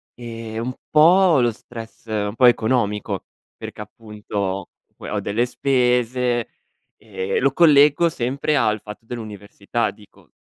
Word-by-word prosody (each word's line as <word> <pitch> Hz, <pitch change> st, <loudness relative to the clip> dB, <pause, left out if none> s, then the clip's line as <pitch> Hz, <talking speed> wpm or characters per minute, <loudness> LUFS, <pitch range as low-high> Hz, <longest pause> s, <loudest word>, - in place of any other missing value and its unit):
Ehm, 115 Hz, -1 st, -6 dB
un 130 Hz, -, -3 dB, 0.2 s
po' 170 Hz, +1 st, +5 dB
lo 120 Hz, -1 st, +2 dB
stress 115 Hz, +1 st, -11 dB
un 105 Hz, -2 st, -2 dB
po' 125 Hz, -, +4 dB
economico, 115 Hz, -3 st, +1 dB, 0.3 s
perché -, -, -9 dB
appunto 105 Hz, -1 st, -9 dB
ho 95 Hz, -1 st, -2 dB, 0.3 s
que -, -, -10 dB
ho -, -, -2 dB
delle 115 Hz, +4 st, 0 dB
spese 125 Hz, -2 st, 0 dB, 0.5 s
e 95 Hz, -3 st, -3 dB
lo 135 Hz, +1 st, +2 dB
collego 150 Hz, +1 st, +5 dB
sempre 140 Hz, +3 st, -1 dB
al 110 Hz, -4 st, +1 dB
fatto 105 Hz, +2 st, -11 dB
dell'università; 110 Hz, -1 st, -4 dB
dico: 105 Hz, -1 st, -21 dB
115 Hz, 130 wpm, -21 LUFS, 105-130 Hz, 0.5 s, po